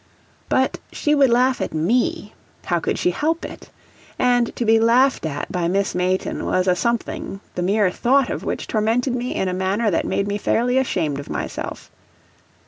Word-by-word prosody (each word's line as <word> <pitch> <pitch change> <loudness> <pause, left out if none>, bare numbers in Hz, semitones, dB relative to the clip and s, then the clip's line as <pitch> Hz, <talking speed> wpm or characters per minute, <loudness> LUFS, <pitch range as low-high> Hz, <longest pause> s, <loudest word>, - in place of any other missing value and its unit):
But 260 0 +1
she 295 - 0
would 280 -3 +5
laugh 250 +2 +2
at - - -3
ME 210 +5 0 0.3
how 175 -2 +1
could - - -2
she 180 - +1
help 320 - -1
it? - - -10 0.5
and 245 -1 +2
to 240 - -2
be 225 0 +5
laughed 235 -3 +3
at 145 -1 -5
by 175 -2 -1
Miss 195 +3 0
Mayton 180 +1 -1
was 185 0 0
a 180 - +4
something 230 -1 -2
the 180 - -3
mere 195 +1 +2
thought 265 +6 +2
of - - -4
which - - -3
tormented 230 +4 0
me 250 0 -3
in 190 - 0
a 180 - -1
manner 195 +4 0
that 165 - 0
made 200 - -1
me 205 0 -2
fairly 245 +5 +1
ashamed 160 - -1
of 140 - -9
myself. - - -5
215 Hz, 185 wpm, -21 LUFS, 180-250 Hz, 0.5 s, would